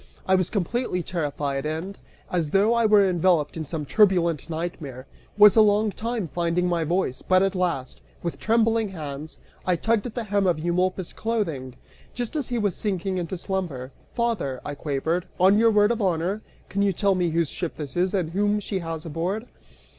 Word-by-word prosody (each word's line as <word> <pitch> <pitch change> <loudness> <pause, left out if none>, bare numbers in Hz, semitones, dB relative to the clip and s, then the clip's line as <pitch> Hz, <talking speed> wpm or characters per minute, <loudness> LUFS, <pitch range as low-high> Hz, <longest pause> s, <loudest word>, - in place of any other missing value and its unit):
I 190 - +3
was 185 -1 +2
completely 200 -1 -1
terrified, 145 -5 -2
and, 160 +6 -4 0.3
as 170 -4 0
though 200 +7 +3
I 235 -1 +3
were 205 -2 +5
enveloped 175 -4 +2
in 160 -1 -4
some 150 0 -4
turbulent 170 -5 +3
nightmare, 155 -6 -5 0.3
was 210 -1 +8
a 220 - +7
long 210 0 +3
time 225 -2 -3
finding 175 +2 0
my 170 -2 +1
voice, 160 -5 -1
but 185 0 +3
at 195 0 +1
last, 175 -9 -2 0.2
with 170 - -3
trembling 225 -1 +2
hands, 155 -3 -7 0.3
I 180 - +2
tugged 225 +5 0
at 225 - -9
the 240 - -2
hem 200 -2 +1
of 175 -3 +2
Eumolpus' 180 +2 -1
clothing, 165 - -2 0.4
just 245 +3 -4
as 290 -5 -1
he 245 - -2
was 205 -5 0
sinking 190 -2 -2
into 175 +1 -4
slumber. 170 -9 -3 0.2
"Father," 225 - -1
I 145 - -3
quavered, 160 +5 -2
"on 195 +3 +5
your 230 0 +5
word 210 0 +4
of 235 -1 -1
honor, 185 +2 0 0.3
can 200 - -2
you 200 -1 +3
tell 200 +2 +2
me 180 -2 +1
whose 165 -1 0
ship 175 -3 -4
this 145 -3 -7
is, 180 +1 +2
and 175 -4 -1
whom 205 +3 +1
she 200 -1 -3
has 165 -1 -5
aboard?" 175 +8 -2
185 Hz, 190 wpm, -25 LUFS, 165-205 Hz, 0.4 s, was